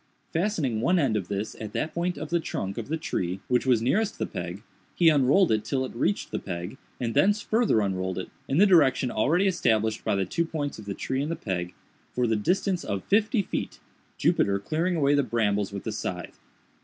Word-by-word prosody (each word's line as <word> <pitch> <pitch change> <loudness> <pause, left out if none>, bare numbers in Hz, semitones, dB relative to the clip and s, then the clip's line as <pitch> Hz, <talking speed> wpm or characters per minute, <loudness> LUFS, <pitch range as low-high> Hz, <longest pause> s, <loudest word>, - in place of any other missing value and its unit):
Fastening 160 - 0
one 180 +9 +3
end 135 -9 +2
of 95 -4 -2
this 100 +2 -3
at 105 -1 -6
that 155 - -2
point 175 -1 -1
of 155 +2 -6
the 170 - +3
trunk, 100 - -4
of 115 - -6
the 160 +3 -1
tree 95 - -2
which 125 +1 +1
was 120 -3 +3
nearest 200 - +1
the - - -1
peg, 90 +3 -6 0.3
he 170 -2 +5
unrolled 150 +5 +4
it 110 -1 +1
till 130 +4 -1
it - - -8
reached 195 +12 -1
the - - -2
peg, 90 +5 -6 0.2
and 115 -2 -2
thence 205 - +3
farther 220 - +2
unrolled 95 -2 -2
it, 95 - -5 0.2
in 135 - 0
the 200 - +7
direction 140 -9 +4
already 165 - +2
established 110 - +1
by - - +1
the 95 -1 0
two 165 - 0
points 150 -6 -4
of 105 - -10
the 100 -1 -4
tree 130 +1 -2
and 145 - -2
the 165 - -1
peg, 90 - -4 0.4
for 125 - +1
the 110 -1 +2
distance 180 - 0
of 100 -1 -3
fifty 210 +2 +2
feet—Jupiter 100 - -2
clearing 160 - -1
away 145 -3 +3
the 145 - +4
brambles 105 -5 0
with 100 -1 -6
the 110 - -3
scythe. 90 -4 -5
125 Hz, 215 wpm, -26 LUFS, 105-170 Hz, 0.4 s, the